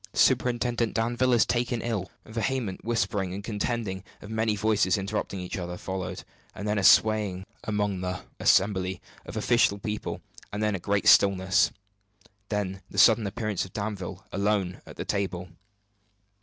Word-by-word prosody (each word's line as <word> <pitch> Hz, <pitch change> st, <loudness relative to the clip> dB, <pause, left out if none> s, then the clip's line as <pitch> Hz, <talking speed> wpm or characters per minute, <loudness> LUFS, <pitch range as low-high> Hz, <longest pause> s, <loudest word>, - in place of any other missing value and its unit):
Superintendent 120 Hz, -2 st, +2 dB
Danville 120 Hz, +3 st, +1 dB
is 115 Hz, -3 st, +5 dB
taken 120 Hz, 0 st, 0 dB
ill!" 105 Hz, -6 st, -2 dB, 0.2 s
A -, -, -13 dB
vehement 115 Hz, -3 st, -2 dB
whispering 100 Hz, -5 st, -1 dB
and 100 Hz, -, -6 dB
contending 105 Hz, -2 st, -2 dB, 0.2 s
of 105 Hz, -, -10 dB
many 110 Hz, -1 st, +1 dB
voices 105 Hz, -3 st, +2 dB
interrupting 100 Hz, 0 st, -3 dB
each 90 Hz, +1 st, -5 dB
other, 90 Hz, 0 st, -5 dB
followed; 95 Hz, 0 st, -5 dB, 0.3 s
then 105 Hz, 0 st, -1 dB
a -, -, -2 dB
swaying 100 Hz, -1 st, +4 dB, 0.2 s
among 105 Hz, -3 st, -1 dB
the 90 Hz, 0 st, -3 dB, 0.2 s
assembly 95 Hz, -2 st, +3 dB, 0.3 s
of -, -, -6 dB
official 110 Hz, -2 st, +3 dB
people; 105 Hz, +1 st, -4 dB, 0.3 s
then 105 Hz, +1 st, 0 dB
a 95 Hz, -, -2 dB
great 100 Hz, +3 st, 0 dB
stillness; 95 Hz, 0 st, +5 dB, 0.8 s
then 95 Hz, -3 st, -2 dB
the -, -, -10 dB
sudden 110 Hz, +1 st, +6 dB
appearance 110 Hz, -1 st, -2 dB
of 95 Hz, -, -10 dB
Danville, 100 Hz, -3 st, -5 dB
alone, 100 Hz, -2 st, 0 dB
at -, -, -10 dB
the -, -, -5 dB
table. 95 Hz, -3 st, -2 dB
100 Hz, 145 wpm, -27 LUFS, 95-110 Hz, 0.8 s, sudden